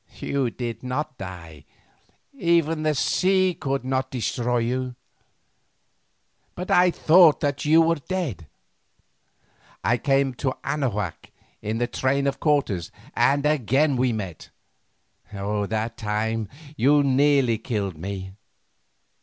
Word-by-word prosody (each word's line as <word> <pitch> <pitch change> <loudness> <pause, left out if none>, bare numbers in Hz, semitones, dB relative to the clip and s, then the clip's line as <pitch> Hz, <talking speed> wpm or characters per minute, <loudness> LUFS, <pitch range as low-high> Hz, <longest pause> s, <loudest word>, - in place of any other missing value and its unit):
You 135 -3 -1
did 115 -1 -5
not 130 +3 -4
die, 85 -6 -9 0.7
even 170 - +1
the 155 -1 +1
sea 185 +5 +2
could 135 -4 -3
not 130 0 -1
destroy 120 0 -1
you. 125 +2 -2 1.6
But 180 +1 -5
I 180 0 +5
thought 170 -1 +5
that 145 -1 -1
you 160 +2 +6
were 165 -2 +1
dead. 155 - -3 1.4
I 120 +1 +2
came 135 -2 +1
to 130 -2 -1
Anahuac 110 - -3 0.3
in 110 +2 -3
the 120 - +1
train 135 +3 0
of 135 -1 -1
Cortes 135 - 0 0.3
and 140 +1 +2
again 145 0 +2
we 125 0 +1
met; 95 -8 -6 0.8
that 105 +2 -2
time 110 0 -2 0.3
you 145 +2 +4
nearly 135 -4 +3
killed 105 -6 -3
me. 95 +3 -6
130 Hz, 115 wpm, -24 LUFS, 110-150 Hz, 1.6 s, you